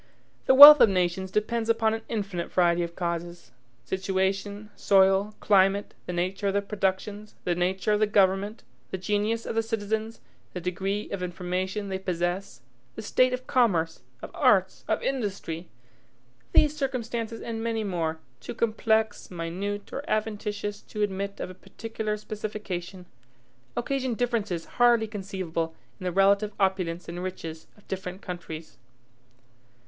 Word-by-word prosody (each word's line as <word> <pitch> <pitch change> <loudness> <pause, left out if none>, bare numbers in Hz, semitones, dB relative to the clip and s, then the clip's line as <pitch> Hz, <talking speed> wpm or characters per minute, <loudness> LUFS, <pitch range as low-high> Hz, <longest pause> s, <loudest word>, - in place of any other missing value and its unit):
The 265 - +6
wealth 290 +2 +13
of - - +8
nations 185 0 0
depends 225 +3 -1
upon 225 -1 +3
an 225 - -3
infinite 195 -6 -3
variety 175 -1 +3
of 170 0 -4
causes. 170 0 -4 0.3
Situation, 195 +4 -2
soil, 195 +1 +3
climate, 195 0 +3
the - - -2
nature 185 +3 -1
of 195 - 0
the 200 - +3
productions, 205 +1 -2
the 175 - +1
nature 185 +4 0
of 210 - +2
the 215 - +3
government, 200 +1 +2 0.3
the 190 - -3
genius 210 +4 -1
of - - -3
the 225 - +2
citizens, 220 0 -3 0.3
the 180 - -4
degree 190 +4 -2
of 200 - -3
information 185 +3 -3
they 190 0 -2
possess, 175 -6 -3 0.3
the - - -6
state 255 +4 +3
of 255 0 -4
commerce, 175 -10 +1 0.2
of - - -7
arts, - - +3
of - - 0
industry, 195 -9 -3 0.8
these 300 0 +4
circumstances 235 -5 -3
and 225 -1 -5
many 225 -1 -1
more, 165 -5 -2 0.2
too - - -7
complex, 220 -1 0
minute, 190 +4 -4
or 280 - -4
adventitious 210 -1 -2
to 210 - -4
admit 200 0 -3
of - - -4
a - - -9
particular 215 +2 -5
specification, 205 -4 -6 0.7
occasion 260 0 -1
differences 220 -8 -1
hardly 240 -2 +3
conceivable 185 -6 -4 0.2
in - - -7
the 180 - 0
relative 200 +3 +3
opulence 185 -3 0
and 175 +1 -5
riches 165 -3 -6
of 205 - -23
different 190 0 -5
countries. 165 -5 -7
200 Hz, 145 wpm, -27 LUFS, 180-220 Hz, 0.8 s, wealth